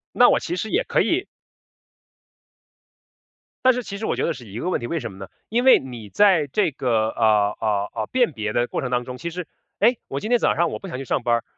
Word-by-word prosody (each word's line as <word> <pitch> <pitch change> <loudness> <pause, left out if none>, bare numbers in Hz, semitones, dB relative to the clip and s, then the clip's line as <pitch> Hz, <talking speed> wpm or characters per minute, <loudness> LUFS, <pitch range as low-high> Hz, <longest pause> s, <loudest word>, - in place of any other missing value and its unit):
那 - - +7
我 - - +3
其 350 - -4
实 220 - -3
也 430 +8 +1
可 - - +1
以 370 +4 0 2.4
但 255 0 +6
是 250 - -3
其 200 -2 -6
实 220 - -4
我 - - 0
觉 - - -2
得 165 - 0
是 120 -5 -12
一 100 +4 -7
个 180 - -2
问 - - 0
题， 120 - -5
为 165 - -2
什 115 -6 -6
么 95 - -13
呢？ 95 0 -8 0.2
因 235 +3 +1
为 265 - +8
你 120 -5 -9
在 185 - +4
这 165 +4 +1
个， 115 -5 0
啊， 105 -3 +3
啊， 105 -2 0
啊， - - -2
辨 250 -5 +2
别 110 -5 -4
的 120 0 +1
过 - - -3
程 130 - -3
当 125 -1 0
中， 125 +1 -7
其 150 +7 -5
实 175 -1 -6 0.3
诶， 240 -1 +3
我 135 - -4
今 215 - -4
天 245 - +4
早 - - +2
上 170 0 +2
我 - - -5
不 195 - -9
想 150 - -5
去 135 - -5
上 125 - -1
班 120 0 +3
儿。 115 - -2
135 Hz, 280 characters per minute, -23 LUFS, -, 2.4 s, 为